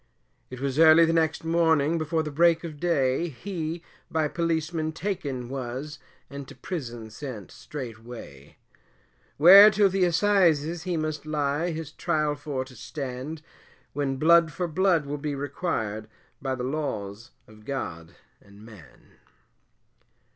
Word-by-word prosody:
It 130 - -8
was 140 +1 -2
early 165 +1 +8
the 165 - +1
next 160 -1 +1
morning, 165 -1 +2
before 160 +1 -1
the 150 - -5
break 165 +2 +3
of 155 -3 -7
day, 150 -2 +1
He 165 +3 -5 0.3
by 155 -2 0
Policemen 160 -1 -1
taken 145 -9 -4
was, 135 +3 -6 0.3
and 140 -1 -8
to - - -12
prison 120 -10 -6
sent 115 -5 -8
straightway, 115 - -10 0.8
Where 195 +7 +10
till 205 -1 +3
the 190 -1 +2
Assizes 170 -3 +2
he 175 -1 -2
must 155 -1 -3
lie, 150 +2 -1
his 160 -2 -5
trial 150 -1 0
for 145 -3 -4
to 130 -1 -15
stand, 140 +4 -6 0.5
When 140 -2 -1
blood 170 +2 +5
for 180 +3 -3
blood 170 -1 +2
will 145 +1 -4
be 145 -1 -3
required, 115 - -3 0.3
by 135 -1 -2
the 125 - -5
laws 115 -7 -4 0.2
of 110 0 -17
God 85 -11 -6 0.3
and 100 +1 -16
man. 105 -9 -17
150 Hz, 140 wpm, -26 LUFS, 130-165 Hz, 0.8 s, Where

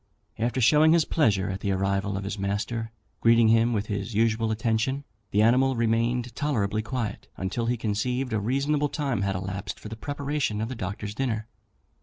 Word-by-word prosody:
After 120 +3 0
showing 150 +6 +5
his 165 -3 +4
pleasure 100 - +2
at 95 - -4
the 100 0 -1
arrival 95 +1 0
of 100 - -4
his 100 +1 -4
master, 105 +3 -2 0.3
greeting 115 -1 +5
him 115 +1 +4
with 105 -3 0
his 100 +1 -4
usual 115 0 +2
attention, 115 +5 0 0.3
the 105 +2 +3
animal 130 +3 +4
remained 115 +1 0
tolerably 110 -8 0
quiet 120 -1 -4
until 95 +5 -2
he 120 0 +1
conceived 120 +4 -1
a 110 - +1
reasonable 140 +6 +1
time 140 -8 -1
had 100 -1 0
elapsed 95 +2 -4
for 105 - -8
the 110 - -6
preparation 140 -3 -2
of 110 +2 -2
the 130 - -4
Doctor's 100 0 -4
dinner. 110 -3 -2
115 Hz, 180 wpm, -26 LUFS, 105-125 Hz, 0.3 s, showing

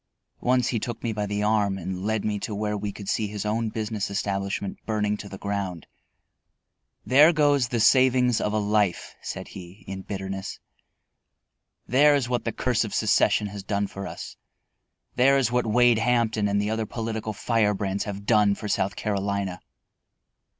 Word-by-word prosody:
Once 125 0 +2
he 115 - 0
took 120 +1 -5
me 115 -2 -1
by 105 -1 -2
the 105 +1 -2
arm 105 -2 +2
and 95 0 -5
led 110 -1 -1
me 105 -1 -1
to 105 +1 -4
where 105 0 -1
we 105 0 -3
could 100 -1 -10
see 110 +1 0
his 105 0 -5
own 110 +1 0
business 110 -2 -3
establishment 100 -1 -3
burning 105 -1 0
to 105 -1 -9
the 95 - -8
ground. 100 -4 -4 1.2
"There 145 +5 +7
goes 145 -5 +3
the 120 0 -2
savings 125 0 +4
of 105 - 0
a 110 - 0
life," 105 -3 0
said - - -6
he, 90 +2 -11
in 95 0 -6
bitterness. 95 -1 -5 1.3
"There 145 +4 +5
is 135 -4 0
what 125 -1 -2
the 115 - 0
curse 120 -1 0
of 110 - -5
secession 105 - +3
has 100 0 -7
done 100 +1 -1
for 100 0 -7
us; - - -8 0.8
there 135 +2 +5
is 130 -3 +1
what 125 -1 +1
Wade 120 +1 +4
Hampton 115 -3 +1
and 100 0 +1
the 105 +1 -1
other 110 -1 -2
political 110 -1 -4
firebrands 100 -2 0
have 100 -1 -6
done 105 -2 +4
for 105 - -6
South 100 -1 0
Carolina." 100 -2 -2
105 Hz, 175 wpm, -25 LUFS, 100-115 Hz, 1.3 s, There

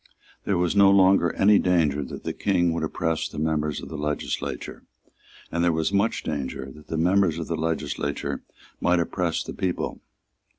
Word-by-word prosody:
There 100 - +1
was 90 +2 +1
no 100 -1 +7
longer 95 -3 +5
any 100 +1 +5
danger 80 -6 +2
that - - -8
the - - -3
King 85 -4 +1
would 85 - -2
oppress 80 +1 -1
the - - -10
members 75 -1 -1
of - - -8
the 80 - -6
legislature; 75 0 -3 0.7
and 85 +1 0
there 85 - +4
was 80 +4 -1
much 100 +3 +1
danger 70 -2 -4
that 75 +2 -15
the 80 - -3
members 90 0 +3
of 85 - -3
the 85 - -2
legislature 80 -2 -2 0.4
might 90 0 +2
oppress 85 0 -1
the - - -7
people. 90 -2 -3
85 Hz, 175 wpm, -25 LUFS, 75-90 Hz, 0.7 s, no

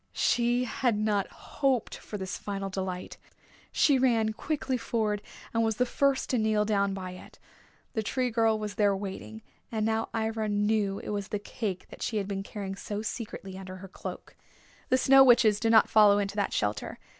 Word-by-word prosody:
She 240 +1 +2
had 245 -2 0
not 210 -2 +1
hoped 265 -5 -1
for 210 - -7
this 190 -1 -4
final 195 -1 -4
delight. 185 -1 -4 0.5
She 280 -3 +4
ran 225 -4 +2
quickly 270 +2 -2
forward 220 -3 -1 0.3
and 230 - +2
was 220 -1 +1
the 250 - +2
first 275 +2 +1
to 250 - +2
kneel 215 -1 +2
down 200 -2 +1
by 185 -1 -5
it. 180 - -12 0.6
The 220 - 0
Tree 250 +3 -1
Girl 225 -1 +3
was 210 -1 -4
there 200 0 +2
waiting, 205 +3 -7 0.3
and 220 -2 -1
now 225 0 0
Ivra 220 -1 -1
knew 205 -1 +1
it - - -7
was 205 -2 -3
the 210 - -2
cake 205 -2 -5
that - - -12
she 220 - -1
had 200 -2 -1
been 195 -1 -3
carrying 195 -1 -6
so 205 +1 -5
secretly 210 -4 -6
under 185 -1 -8
her 190 +1 -9
cloak. 185 - -8 0.5
The 255 - +4
Snow 270 +1 +7
Witches 230 -5 +5
did 225 0 +2
not 220 -1 +6
follow 210 -2 +6
into 200 0 -2
that 205 -1 0
shelter. 105 0 -2
215 Hz, 190 wpm, -28 LUFS, 200-230 Hz, 0.6 s, Snow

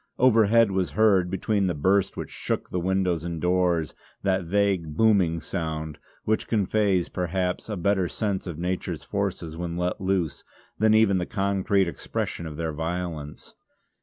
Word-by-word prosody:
Overhead 115 -3 +5
was 95 -6 -1
heard, 95 -3 +4
between 100 +1 0
the 90 - -1
burst 95 +6 +1
which - - -5
shook - - -3
the 90 - -1
windows 90 -2 0
and 85 -1 -4
doors, 90 -2 +1 0.3
that 95 -2 +1
vague, 90 -4 0
booming 100 -7 +3
sound, 80 -2 -4 0.2
which 110 0 0
conveys 100 -4 +1
perhaps 90 +2 -2
a 105 - -3
better 95 0 +1
sense 100 0 -2
of 85 -4 -5
nature's 90 +2 -3
forces 80 -1 -3
when 85 0 -4
let 90 +1 -2
loose, 95 -6 -1 0.4
than 110 0 +4
even 105 -4 +4
the 90 - -3
concrete 100 -1 +1
expression 85 +1 -4
of 75 -2 -8
their 80 -1 -2
violence. 80 -2 -5
90 Hz, 155 wpm, -25 LUFS, 85-100 Hz, 0.4 s, Overhead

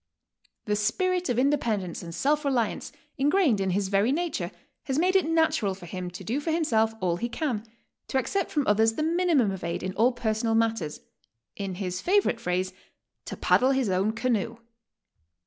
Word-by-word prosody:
The 210 - +1
spirit 360 - 0
of 240 - 0
independence 235 - 0
and 170 -1 -7
self 295 +2 +1
reliance, 255 -6 -1 0.3
ingrained 290 - +3
in 190 - 0
his 190 +1 0
very 200 +5 +3
nature, 340 +3 -1 0.4
has 265 -2 -1
made 365 +4 +2
it 370 -5 +3
natural 315 -12 +2
for 185 -2 -12
him 180 +1 -5
to 180 +2 -9
do 240 +9 -1
for 295 - -4
himself 225 -10 +2
all 175 -2 +1
he 235 +6 -3
can, 240 -5 -2 0.4
to - - -1
accept 340 +9 0
from 290 -3 0
others 220 +2 +3
the 305 - -2
minimum 325 - +2
of 190 -1 -6
aid 170 +1 -3
in 185 0 -3
all 230 +5 +3
personal 225 -1 -1
mat 225 0 +2
ters, 155 -6 -6 0.3
— 115 0 -56
in 195 -2 -4
his 180 -1 -3
favorite 385 - +2
phrase, 185 -3 -1 0.5
"to - - -6
paddle 255 - +3
his 265 -5 +1
own 195 +4 +1
canoe." 230 -1 -1
225 Hz, 185 wpm, -27 LUFS, 195-295 Hz, 0.5 s, ingrained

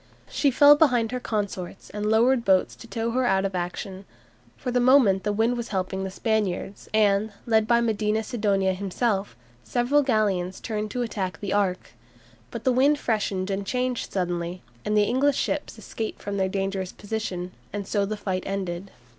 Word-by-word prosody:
She 285 - +1
fell 285 +3 +7
behind 245 -7 +3
her 250 - -2
consorts, 200 -5 -4
and 210 0 -2
lowered 235 +3 +4
boats 190 -3 +3
to 230 - -12
tow 230 0 -2
her 255 +2 +1
out 195 -5 +2
of 195 - -2
action. 185 +2 -4 0.5
For 250 - -3
the 250 - +2
moment 245 -7 +5
the 210 - 0
wind 225 +4 +1
was 235 -1 -4
helping 190 -1 -2
the 190 - -3
Spaniards, 200 -2 -2
and, 210 0 +3
led 220 -2 +3
by 235 0 +4
Medina 220 -1 0
Sidonia 200 -5 +1
himself, 200 - -1 0.3
several 250 +4 +2
galleons 205 -8 0
turned 215 -1 -3
to 245 +3 -2
attack 190 -7 -3
the 200 -2 -3
"Ark." 195 -3 0 0.6
But - - -7
the 255 - +3
wind 280 +4 +4
freshened 205 -6 -1
and 195 +1 -2
changed 250 +3 -2
suddenly, 175 -1 -2 0.2
and 210 0 0
the 210 - +5
English 265 +6 +2
ships - - -2
escaped 220 -1 -5
from 200 0 -4
their 190 -1 +1
dangerous 195 -1 -2
position, 195 -4 -4 0.2
and 205 -1 -5
so 205 -2 +1
the 210 +2 -3
fight 190 -2 -2
ended. 195 -1 -3
210 Hz, 180 wpm, -25 LUFS, 190-235 Hz, 0.6 s, fell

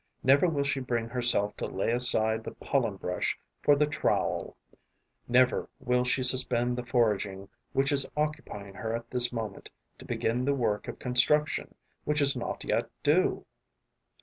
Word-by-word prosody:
Never 140 +7 +5
will 145 -4 0
she 140 -1 -1
bring 120 -3 -2
herself 120 -4 +2
to - - -3
lay 95 +4 -1
aside 110 -2 +2
the - - -8
pollen 120 -7 -1
brush 90 -1 -2 0.2
for 145 - +5
the 150 +1 +3
trowel; 145 0 -1 0.7
never 125 +1 +3
will 125 0 +1
she 130 +1 +1
suspend 125 -1 +2
the 125 - -4
foraging 105 -5 0 0.2
which 135 +1 +2
is 140 -1 +3
occupying 150 -10 -3
her 115 +2 -3
at 115 0 -7
this 125 -1 +2
moment 110 -5 -6 0.3
to - - -12
begin 120 +3 -1
the 140 +1 +1
work 110 -5 -1
of - - -6
construction 140 +4 +1 0.3
which 150 0 0
is 140 -1 +3
not 120 - -4
yet - - -1
due. - - +2
125 Hz, 160 wpm, -29 LUFS, 115-135 Hz, 0.7 s, Never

